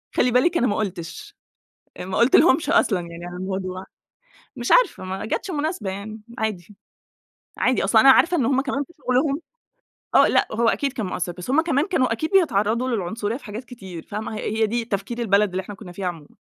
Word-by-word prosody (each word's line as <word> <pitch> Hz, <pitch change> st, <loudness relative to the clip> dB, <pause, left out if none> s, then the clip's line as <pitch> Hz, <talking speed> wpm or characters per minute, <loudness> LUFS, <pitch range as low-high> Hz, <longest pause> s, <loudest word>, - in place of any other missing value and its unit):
خلِّي 250 Hz, -, +3 dB
بالِك، 330 Hz, +8 st, +3 dB
أنا 250 Hz, -, +2 dB
ما 205 Hz, -, 0 dB
قُلتش، 210 Hz, -, -5 dB, 0.7 s
ما 190 Hz, +1 st, -4 dB
قُلتلهُمش 280 Hz, +4 st, +4 dB
أصلًا 195 Hz, -5 st, +3 dB
يعني 170 Hz, 0 st, -8 dB
على 175 Hz, -, -7 dB
الموضوع. 185 Hz, 0 st, -4 dB, 0.7 s
مش 240 Hz, -2 st, -3 dB
عارفة، -, -, +4 dB
ما 190 Hz, +2 st, -5 dB
جاتش 365 Hz, -, -3 dB
مناسبة 300 Hz, -, -2 dB
يعني، 210 Hz, +3 st, -7 dB, 0.2 s
عادي. 210 Hz, -3 st, -4 dB, 0.8 s
عادي 255 Hz, -, +2 dB
أصلًا، 220 Hz, -2 st, +5 dB
أنا 270 Hz, -, +8 dB
عارفة 345 Hz, +6 st, +4 dB
إن 255 Hz, -, +1 dB
هُم 270 Hz, +1 st, +2 dB
كمان 275 Hz, +1 st, -2 dB
في 345 Hz, -, -20 dB
شغلهم. 275 Hz, +3 st, 0 dB, 0.7 s
آه -, -, +7 dB
لأ، -, -, +2 dB
هو 230 Hz, +1 st, +2 dB
أكيد 275 Hz, +1 st, -1 dB
كان 220 Hz, -6 st, -3 dB
مأثِّر، 180 Hz, -1 st, -3 dB
بس 180 Hz, +6 st, -9 dB
هُمَّ 285 Hz, +5 st, +4 dB
كمان 310 Hz, -3 st, +1 dB
كانوا 260 Hz, -10 st, +1 dB
أكيد 310 Hz, -, -2 dB
بيتعرَّضوا 240 Hz, -, +2 dB
للعنصرية 220 Hz, +1 st, -2 dB
في -, -, -16 dB
حاجات 215 Hz, +4 st, -6 dB
كتير، 190 Hz, -9 st, -9 dB
فاهمة؟ 215 Hz, +1 st, -5 dB
هي 215 Hz, +1 st, -3 dB
هي 220 Hz, -, +5 dB
دي 235 Hz, +1 st, -2 dB
تفكير 205 Hz, +2 st, -4 dB
البلد 210 Hz, -2 st, +3 dB
اللي 185 Hz, +1 st, -3 dB
إحنا 200 Hz, +2 st, -9 dB
كنّا 190 Hz, -2 st, -11 dB
فيها 185 Hz, +1 st, -4 dB
عمومًا. 165 Hz, -4 st, -6 dB
220 Hz, 195 wpm, -23 LUFS, 190-265 Hz, 0.8 s, أنا